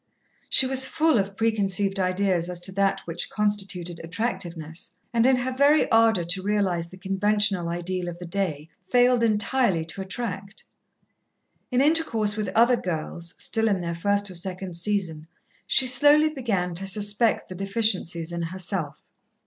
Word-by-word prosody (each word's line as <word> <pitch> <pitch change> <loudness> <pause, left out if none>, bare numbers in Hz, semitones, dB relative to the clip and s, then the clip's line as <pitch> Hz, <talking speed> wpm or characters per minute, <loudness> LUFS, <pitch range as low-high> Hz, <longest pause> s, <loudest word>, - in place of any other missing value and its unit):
She 265 - +5
was 265 0 +5
full 315 -6 +2
of 195 0 -4
preconceived 200 -3 0
ideas 185 -2 0
as 180 -1 -2
to 190 - -4
that 195 0 0
which 170 0 -4
constituted 195 -5 -3
attractiveness, 170 -3 -5 0.2
and 235 +1 +3
in 265 - +4
her 250 +1 -2
very 285 +4 +3
ardour 225 -5 +3
to 180 +3 -1
realize 190 -4 -1
the 185 - -13
conventional 195 -1 0
ideal 175 +1 -3
of 175 -1 -6
the 180 - -9
day 170 -5 -3 0.2
failed 245 -1 +3
entirely 215 -4 +1
to 165 +4 -6
attract. 195 0 -6 1.1
In 250 +1 +2
intercourse 270 -9 +1
with 210 -3 -3
other 240 +2 +4
girls, 170 -1 -2
still 225 0 +1
in 200 -3 +1
their 170 -1 -4
first 200 +3 -1
or - - -9
second 180 0 -5
season, 170 -4 -1 0.4
she 265 - +4
slowly 290 +4 +6
began 215 - -2
to 190 +3 -4
suspect 205 +3 +1
the - - -8
deficiencies 190 -4 0
in 170 0 -4
herself. 170 -2 -4
195 Hz, 155 wpm, -24 LUFS, 175-225 Hz, 1.1 s, slowly